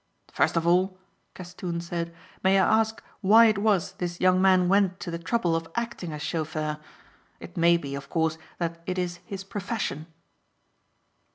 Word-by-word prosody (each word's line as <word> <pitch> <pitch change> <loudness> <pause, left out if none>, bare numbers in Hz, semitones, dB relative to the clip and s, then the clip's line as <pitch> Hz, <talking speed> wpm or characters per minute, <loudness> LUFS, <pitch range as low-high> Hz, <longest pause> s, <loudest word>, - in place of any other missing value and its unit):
"First - - +2
of 165 - +1
all," 185 +2 +2 0.4
Castoon 175 -1 -5
said, 170 0 -4 0.3
"may 190 +1 +4
I 220 +3 +4
ask 220 0 -2 0.2
why 220 +3 +7
it 215 -3 +3
was 200 -4 +2
this 175 -3 -5
young 185 0 +4
man 185 -2 +5
went 190 -1 +2
to 175 - -4
the 170 - -4
trouble 175 -2 0
of 165 0 -2
acting 235 -7 -3
as 150 -1 -6
chauffeur. 155 -2 -2 0.6
It - - -11
may 170 0 +4
be, 140 -4 -6
of 140 0 -7
course, 160 -1 0 0.2
that 170 -1 -3
it 185 0 -2
is 175 -1 -2
his 195 0 -6
profession." 195 -6 -4
180 Hz, 170 wpm, -26 LUFS, 170-195 Hz, 0.6 s, why